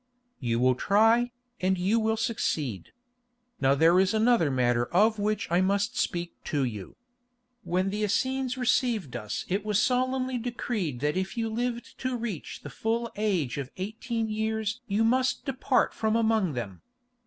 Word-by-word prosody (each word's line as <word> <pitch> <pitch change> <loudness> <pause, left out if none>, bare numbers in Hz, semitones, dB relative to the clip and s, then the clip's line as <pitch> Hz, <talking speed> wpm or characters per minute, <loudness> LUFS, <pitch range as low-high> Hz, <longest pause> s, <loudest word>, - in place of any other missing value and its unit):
"You 115 -3 0
will 130 +1 +4
try, 225 - +3 0.3
and 185 +1 +1
you 195 +6 +2
will 220 0 +1
succeed. 150 - -2 0.7
Now 135 0 +3
there 165 +5 +5
is 190 +3 +2
another 220 -7 +3
matter 120 -2 +1
of 215 +4 +3
which 210 +1 0
I 175 +2 +4
must 200 +5 +1
speak 170 -1 -2
to 145 -4 0
you. 105 -7 -5 0.7
When 185 +2 0
the 210 +1 -3
Essenes 260 +4 0
received 240 - +1
us 105 0 -4
it 195 +2 -1
was 210 -1 +1
solemnly 255 +1 +1
decreed 220 - -3
that 150 +4 0
if 190 +4 -3
you 225 -1 0
lived 240 +1 -3
to 255 -1 -2
reach 225 -8 -5
the 145 - -8
full 230 - -2
age 185 - 0
of 135 -2 -5
eighteen 220 +4 -3
years 220 +2 -2
you 210 +2 +1
must 255 +3 +1
depart 265 0 +1
from 220 0 0
among 220 -7 +2
them. 105 -7 -5
215 Hz, 160 wpm, -28 LUFS, 170-235 Hz, 0.7 s, there